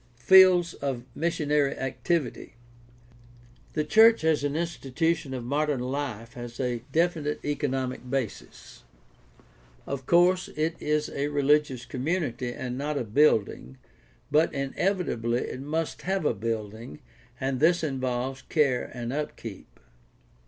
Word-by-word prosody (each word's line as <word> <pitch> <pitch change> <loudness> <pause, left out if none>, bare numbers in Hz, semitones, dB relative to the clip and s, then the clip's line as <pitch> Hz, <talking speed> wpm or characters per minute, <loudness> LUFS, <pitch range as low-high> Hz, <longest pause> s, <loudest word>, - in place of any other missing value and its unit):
FIELDS 180 +5 +6
OF 135 -4 -4
MISSIONARY 150 -3 0
ACTIVITY 135 -2 -2 1.2
The 155 - 0
church 220 +5 +6
as 160 -3 +2
an 145 0 -1
institution 165 -2 -1
of 125 - -5
modern 145 +2 0
life 125 -3 -4
has 120 -1 -8
a 125 -3 -1
definite 160 -3 0
economic 135 -3 -2
basis. 130 -5 -5 1.0
Of 135 -2 -5
course 180 +2 +4
it 160 +2 0
is 150 0 0
a 140 +1 -2
rehgious 145 -3 +1
community 130 -4 -2
and 125 +1 -5
not 150 +1 -2
a 130 - -1
building, 105 - +2 0.5
but 155 +3 +4
inevitably 140 - -1
it 130 - -5
must 155 +3 -3
have 190 -2 -1
a - - +3
building, 110 +2 -5 0.4
and 130 -1 -1
this 170 +2 +3
involves 130 -2 -2
care 140 -6 +1
and 120 0 -4
upkeep. 130 -8 -6
140 Hz, 120 wpm, -27 LUFS, 125-155 Hz, 1.2 s, FIELDS